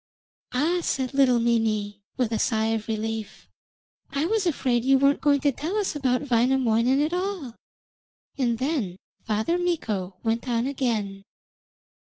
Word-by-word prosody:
'Ah!' 315 +8 +1
said 260 -4 -2
little 265 -3 +4
Mimi, 215 -3 0 0.2
with 245 -3 0
a 220 - 0
sigh 220 -2 +1
of 220 -1 -3
relief, 220 -1 -4 0.6
'I 280 +3 -1
was 415 0 +1
afraid 250 -7 +1
you 270 +1 +5
weren't 275 +2 +3
going 285 -2 +3
to 285 - +3
tell 315 - -4
us 405 -6 -1
about 270 0 0
Wainamoinen 245 +1 +3
at 310 +3 -1
all.' 360 - -3 0.8
And 240 -4 0
then 255 - -1 0.3
Father 220 +11 0
Mikko 215 - -2
went 230 +2 -1
on 235 0 +1
again. 225 -8 -2
250 Hz, 145 wpm, -25 LUFS, 225-285 Hz, 0.8 s, you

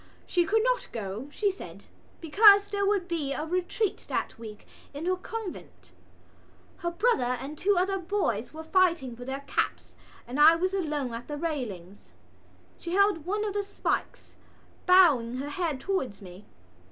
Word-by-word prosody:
She 350 -1 +1
could 440 +3 +2
not - - 0
go, 215 +2 -5
she 405 +5 0
said, 385 - -11 0.4
because 405 +5 +6
there 400 -1 0
would 395 -3 +1
be 310 -6 -2
a 305 - -3
retreat 365 +5 -2
that - - -3
week 215 -2 -10 0.3
in 300 +4 -5
her 370 +1 +2
convent. 410 +1 -8 0.9
Her 345 - -2
brother 340 - +1
and 280 +4 -7
two 390 +5 +1
other 385 +2 +1
boys 335 - -1
were 315 +1 -8
fighting 335 -7 +2
for 245 +1 -10
their 270 +1 -4
caps 280 - -3 0.3
and 255 +4 -4
I 315 +2 +8
was 370 +3 -1
alone 300 -9 -2
at 230 +1 -7
the 295 - -5
railings. 225 - -5 0.7
She 340 - -5
held 395 -5 +2
one 420 +2 -1
of 410 - -3
the 410 0 -1
spikes, 400 - -4 0.5
bowing 300 -11 +5
her 280 +2 -4
head 315 -4 -2
towards 265 - -2
me. 185 +1 -12
335 Hz, 165 wpm, -28 LUFS, 260-390 Hz, 0.9 s, I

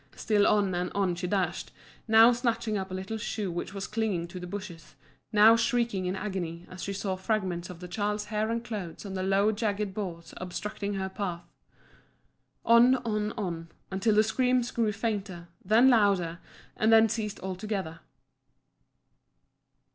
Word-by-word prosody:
Still 210 -2 +2
on 200 -3 +2
and 180 0 -1
on 195 -3 +1
she 175 +1 -4
dashed, 190 -1 -1 0.4
now 225 +2 +7
snatching 235 -2 -1
up 190 -1 -3
a - - -7
little 190 +4 -4
shoe 205 -3 -3
which 175 +2 -4
was 195 0 -5
clinging 210 -6 -1
to 180 - -7
the 180 - -7
bushes, 175 -5 -8 0.4
now 215 +2 +7
shrieking 230 -4 0
with 185 - -1
agony 180 -4 -4
as 185 -1 -8
she 200 - -3
saw 195 -1 -2
fragments 185 -3 -2
of 180 -1 -10
the 180 - -7
child's 210 +2 -2
hair 215 +1 -1
and 230 +1 -2
clothes 200 -7 -6
on 195 - -6
the 190 - -2
low 195 +3 +3
jagged 210 -2 -2
boughs 175 -5 -6
obstructing 200 +3 -4
her 190 0 -2
path. 185 -3 -4 1.2
On, 235 +3 +6
on, 210 -1 -1
on, 170 -6 -4 0.2
until 200 +3 +1
the 215 - +6
screams 250 +2 +1
grew 225 -3 +1
fainter, 200 -5 -4
then 220 +6 +5
louder, 195 -7 +2 0.4
and 220 +1 +2
then 225 0 +7
ceased 215 -1 -3
altogether. 190 -3 -4
200 Hz, 160 wpm, -28 LUFS, 185-220 Hz, 1.2 s, now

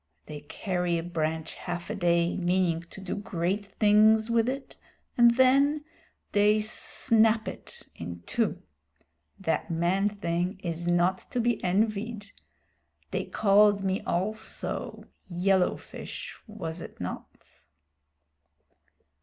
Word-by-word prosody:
They 150 -1 -7
carry 180 +3 -2
a 165 - -3
branch 160 -2 -2
half 175 +2 -5
a - - -3
day, 170 -2 +2
meaning 175 -2 +1
to - - -11
do 190 -1 -4
great 190 0 -2
things 215 +2 +4
with 230 +1 +3
it, 270 +1 -5 0.4
and 235 -1 +6
then 280 +3 +4 0.5
they 210 +1 +4
snap 220 +1 +2
it - - -9
in 85 +1 -8
two. - - -1 0.8
That 165 -4 -1
man 175 +5 +1
thing 185 -1 -2
is 170 0 -3
not 175 +2 +2
to 250 - -2
be 235 -2 0
envied. 210 +2 -1 0.8
They - - -2
called 205 -1 +4
me 190 0 0
also 215 +5 -3 0.3
`yellow 185 +1 +2
fish' - - -8
was 175 -6 -6
it - - -10
not?" - - -8
195 Hz, 120 wpm, -28 LUFS, 175-215 Hz, 0.8 s, and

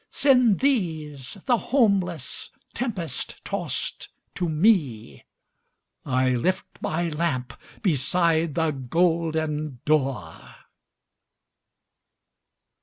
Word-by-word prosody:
Send 250 -7 +4
these, 160 - -1
the 245 - +3
homeless, 195 - 0 0.2
tempest 200 - -3
tost - - -3 0.3
to 175 -2 -2
me, 150 - +1 0.8
I 130 -1 +1
lift 180 +10 0 0.2
my 170 +2 -1
lamp 150 -5 -2 0.3
beside 165 - +2
the 160 -1 +1
golden 155 0 0
door!" 135 - -1
160 Hz, 75 wpm, -25 LUFS, 135-185 Hz, 0.8 s, Send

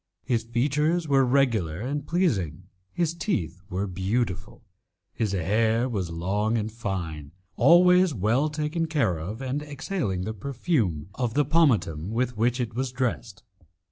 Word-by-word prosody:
His 120 -4 0
features 150 +8 0
were 135 -2 +4
regular 115 - +1
and 140 +5 -3
pleasing, 100 - 0 0.3
his 165 - 0
teeth 90 - -2
were 95 +1 -2
beautiful, 100 +2 -2 0.5
his 110 -4 -1
hair 110 +6 +1
was 100 -8 -2
long 100 +7 0
and 110 0 -2
fine, 85 -9 -5 0.2
always 180 +5 +6
well 120 +6 +1
taken 155 +2 -2
care 140 - +1
of, 105 +11 -6
and 135 +3 -2
exhaling 145 - -3
the 110 +3 -3
perfume 110 - -1
of 120 0 -2
the 145 0 +3
pomatum 120 - +2
with 120 +2 -1
which 120 +4 +1
it 120 -3 -2
was 130 +2 -2
dressed. 120 -5 -3
115 Hz, 140 wpm, -26 LUFS, 95-145 Hz, 0.5 s, always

